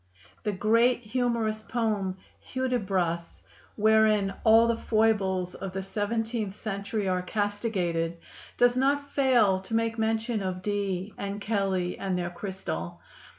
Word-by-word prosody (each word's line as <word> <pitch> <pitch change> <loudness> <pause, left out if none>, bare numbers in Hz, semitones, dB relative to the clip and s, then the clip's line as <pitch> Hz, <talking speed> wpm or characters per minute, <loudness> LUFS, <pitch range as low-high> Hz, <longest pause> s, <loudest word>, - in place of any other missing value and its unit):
The 210 - -1
great 230 +5 +3
humorous 230 -2 -1
poem 215 -5 -1 0.2
"Hudibras," 190 -10 -1 0.4
wherein 215 -2 +4
all 225 +1 +7
the 235 - +2
foibles 200 -5 +1
of 195 -1 -6
the 190 0 -3
seventeenth 215 +1 -2
century 200 -1 -3
are 185 -1 +1
castigated, 185 -5 -1 0.4
does 245 0 +4
not 280 +2 +1
fail 240 -9 +4
to 190 +4 -5
make 225 0 0
mention 220 0 0
of 185 -1 -3
Dee 200 -1 -2
and 200 +1 -4
Kelley 195 -4 -1
and 190 -2 -1
their 175 -1 -2
crystal. 170 - -5
210 Hz, 125 wpm, -28 LUFS, 190-225 Hz, 0.4 s, all